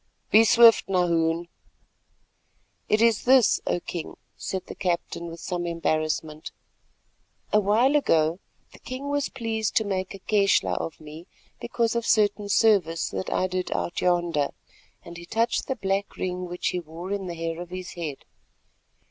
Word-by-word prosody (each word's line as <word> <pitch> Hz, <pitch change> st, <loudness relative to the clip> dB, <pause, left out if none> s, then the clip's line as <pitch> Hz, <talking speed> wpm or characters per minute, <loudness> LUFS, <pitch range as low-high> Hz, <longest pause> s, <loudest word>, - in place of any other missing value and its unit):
"Be 220 Hz, -, +7 dB
swift, 230 Hz, +1 st, +6 dB
then, 195 Hz, -, -2 dB
Nahoon." 170 Hz, -1 st, +1 dB, 1.4 s
"It 215 Hz, +2 st, +3 dB
is 230 Hz, -3 st, +2 dB
this, 255 Hz, -3 st, +5 dB
O -, -, +1 dB
King," 170 Hz, -1 st, -7 dB, 0.2 s
said 190 Hz, -1 st, -5 dB
the -, -, -8 dB
captain 170 Hz, -1 st, -3 dB
with 165 Hz, 0 st, -9 dB
some 175 Hz, 0 st, -3 dB
embarrassment: 155 Hz, -2 st, -2 dB, 1.0 s
"A 210 Hz, -, +6 dB
while 220 Hz, +8 st, +3 dB
ago 165 Hz, -, +2 dB, 0.3 s
the -, -, -15 dB
king 265 Hz, +2 st, -6 dB
was 285 Hz, -1 st, -1 dB
pleased 225 Hz, -4 st, -3 dB
to 220 Hz, -, +4 dB
make 190 Hz, -2 st, -3 dB
a -, -, -11 dB
keshla 195 Hz, -, +2 dB
of 80 Hz, -1 st, -5 dB
me 155 Hz, +3 st, -11 dB, 0.3 s
because 235 Hz, -1 st, -1 dB
of 235 Hz, -1 st, -1 dB
certain 205 Hz, -1 st, +2 dB
service 195 Hz, -7 st, +3 dB
that 95 Hz, -1 st, -4 dB
I -, -, +1 dB
did 185 Hz, 0 st, -3 dB
out -, -, -3 dB
yonder——" 175 Hz, -5 st, +1 dB, 0.6 s
and 170 Hz, 0 st, -9 dB
he 170 Hz, -, -10 dB
touched 230 Hz, +4 st, 0 dB
the 265 Hz, -, -1 dB
black 195 Hz, -1 st, -2 dB
ring 180 Hz, 0 st, -3 dB
which 175 Hz, 0 st, -2 dB
he 180 Hz, -, -2 dB
wore 170 Hz, +3 st, -8 dB
in 200 Hz, -2 st, -3 dB
the 170 Hz, -, -5 dB
hair 165 Hz, 0 st, -4 dB
of 175 Hz, -, -8 dB
his 185 Hz, 0 st, -7 dB
head. 155 Hz, -6 st, -6 dB
185 Hz, 165 wpm, -25 LUFS, 170-215 Hz, 1.4 s, Be